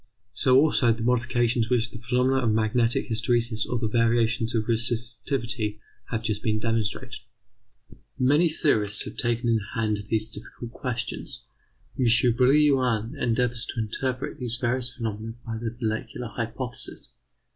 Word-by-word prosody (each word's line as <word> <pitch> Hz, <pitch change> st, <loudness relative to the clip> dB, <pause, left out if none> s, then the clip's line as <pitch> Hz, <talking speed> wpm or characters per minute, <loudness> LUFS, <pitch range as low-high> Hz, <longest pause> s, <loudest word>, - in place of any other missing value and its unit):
So 130 Hz, +1 st, +4 dB
also 140 Hz, -4 st, +4 dB
the 115 Hz, 0 st, -2 dB
modifications 120 Hz, -1 st, +1 dB
which 120 Hz, -2 st, +1 dB
the 115 Hz, -, -8 dB
phenomena 125 Hz, +2 st, +1 dB
of 115 Hz, -3 st, +2 dB
magnetic 110 Hz, +2 st, +2 dB
hysteresis 115 Hz, 0 st, +1 dB
or 120 Hz, -, 0 dB
the 115 Hz, -1 st, -1 dB
variations 115 Hz, 0 st, +2 dB
of 110 Hz, -, +2 dB
resistivity 115 Hz, -1 st, -2 dB, 0.3 s
have 115 Hz, -2 st, -2 dB
just 110 Hz, -2 st, -1 dB
demonstrated. 110 Hz, +2 st, -1 dB, 1.0 s
Many 145 Hz, +6 st, +4 dB
theorists 105 Hz, -10 st, +1 dB
have -, -, -7 dB
taken 120 Hz, 0 st, 0 dB
in 115 Hz, -1 st, +3 dB, 0.2 s
hand 110 Hz, -2 st, 0 dB
these 110 Hz, -1 st, +1 dB
difficult 115 Hz, +2 st, -8 dB
questions. 120 Hz, -2 st, -5 dB, 0.6 s
M. 130 Hz, -, +3 dB, 0.3 s
Brillouin 130 Hz, -3 st, +3 dB
endeavours 120 Hz, 0 st, 0 dB
to -, -, -4 dB
interpret 130 Hz, +6 st, -3 dB
these 120 Hz, -2 st, -2 dB
various 125 Hz, 0 st, -1 dB
phenomena 115 Hz, -2 st, -5 dB
by 110 Hz, -1 st, -4 dB
the 115 Hz, 0 st, -5 dB
molecular 115 Hz, +1 st, -3 dB
hypothesis. 120 Hz, +1 st, -5 dB
115 Hz, 135 wpm, -26 LUFS, 110-125 Hz, 1.0 s, So